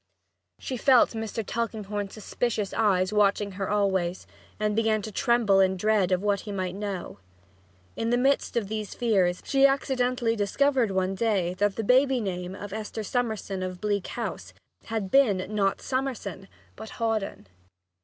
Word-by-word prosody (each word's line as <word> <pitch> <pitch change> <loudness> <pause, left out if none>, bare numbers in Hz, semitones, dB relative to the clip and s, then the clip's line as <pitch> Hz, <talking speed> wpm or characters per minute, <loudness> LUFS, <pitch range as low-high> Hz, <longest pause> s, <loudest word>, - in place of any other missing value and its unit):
She 260 - -5
felt 255 0 +5
Mr. 225 -1 -4
Tulkinghorn's 210 -3 -3
suspicious 215 -1 -2
eyes 195 -3 +2
watching 205 0 +2
her 195 0 -4
always 190 -3 0 0.3
and 210 -1 0
began 220 -1 +1
to 215 - -6
tremble 230 -3 +3
in 190 0 +3
dread 205 -2 +2
of 185 +1 +1
what 205 -1 +1
he 205 - -7
might 185 -2 -3
know. 195 - -5 0.8
In 225 - -2
the 240 - +3
midst 270 -1 +1
of 215 -4 0
these 215 0 -4
fears, 190 -7 +1
she 275 0 +5
accidentally 250 -3 0
discovered 250 +3 +2
one 190 0 0
day 195 -4 0
that 205 -1 +2
the 225 - -2
baby 260 +3 +4
name 180 -3 -4
of 200 0 -8
Esther 220 0 -5
Summerson 220 -4 -2
of 185 -1 -4
Bleak 205 -1 -1
House - - -5 0.3
had 220 -4 -3
been, 210 -10 +4
not 200 -2 +1
Summerson, 250 -8 -3 0.3
but 220 +1 -9
Hawdon. 220 - -2
210 Hz, 155 wpm, -27 LUFS, 195-230 Hz, 0.8 s, felt